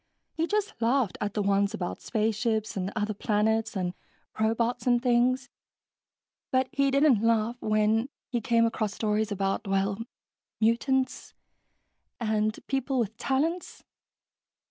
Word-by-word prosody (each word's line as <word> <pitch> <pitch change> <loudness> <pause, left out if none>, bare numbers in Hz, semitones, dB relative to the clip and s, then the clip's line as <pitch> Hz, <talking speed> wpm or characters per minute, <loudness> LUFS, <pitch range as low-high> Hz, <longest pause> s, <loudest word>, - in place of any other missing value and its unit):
He 325 +1 -1
just 420 +1 0
laughed 235 -3 +1
at 205 -1 -2
the 210 - +1
ones 200 0 +2
about 175 - -4
space 220 -1 0
ships 220 -1 -1
and 190 0 -2
other 215 0 -1
planets 220 +2 0
and 180 -1 -1 0.5
robots 230 +2 0
and 245 -1 +4
things, 250 +2 +2 1.0
but 260 0 +2
he 275 -3 +2
didn't 275 -5 +4
laugh 230 +1 +1
when 215 +3 +2 0.3
came 230 -1 +3
across 215 -3 -1
stories 215 0 0
about... 195 +1 -1
well, 195 +1 0 0.6
mutants, 255 +4 +1 0.8
and 215 -2 0
people 270 0 -1
with 225 -3 -1
talents...." 320 +7 -1
225 Hz, 125 wpm, -28 LUFS, 210-255 Hz, 1.0 s, and